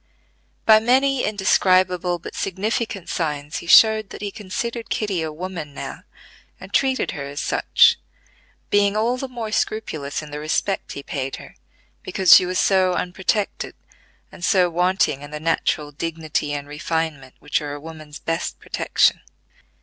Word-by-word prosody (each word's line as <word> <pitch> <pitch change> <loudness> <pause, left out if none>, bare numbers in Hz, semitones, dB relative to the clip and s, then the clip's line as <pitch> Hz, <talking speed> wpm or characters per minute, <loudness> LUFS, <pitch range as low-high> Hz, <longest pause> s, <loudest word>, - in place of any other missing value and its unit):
By 220 -1 +7
many 260 +3 +2
indescribable 185 -3 +2
but 170 - -9
significant 200 0 -2
signs 150 -3 -3
he - - -11
showed 220 +2 +6
that - - -9
he 200 - -3
considered 230 +4 -5
Kitty 200 -5 -1
a 160 -1 -3
woman 165 -3 -6
now - - -7 0.5
and - - -12
treated 265 -1 +1
her 140 - -6
as 140 +1 -6
such, - - +4 0.7
being 205 0 +3
all 235 +3 +1
the 270 - -4
more 235 -4 -6
scrupulous 155 -11 -2
in 150 - -11
the 150 - -5
respect 155 +5 -1
he 140 - -7
paid 135 -4 -4
her, - - -12 0.5
because 190 -3 +6
she 180 - +5
was 185 0 -2
so 185 -2 +3
unprotected, 190 +4 -2 0.6
and 175 - -12
so 185 -2 +3
wanting 180 -4 +1
in 145 - -9
the 150 0 -6
natural 155 -2 0
dignity 155 -1 -3
and 145 -1 -4
refinement 150 -2 -3
which 150 +1 -1
are 145 -1 -5
a - - -8
woman's 155 -1 -10
best 165 +1 -3
protection. - - +1
180 Hz, 155 wpm, -22 LUFS, 150-205 Hz, 0.7 s, By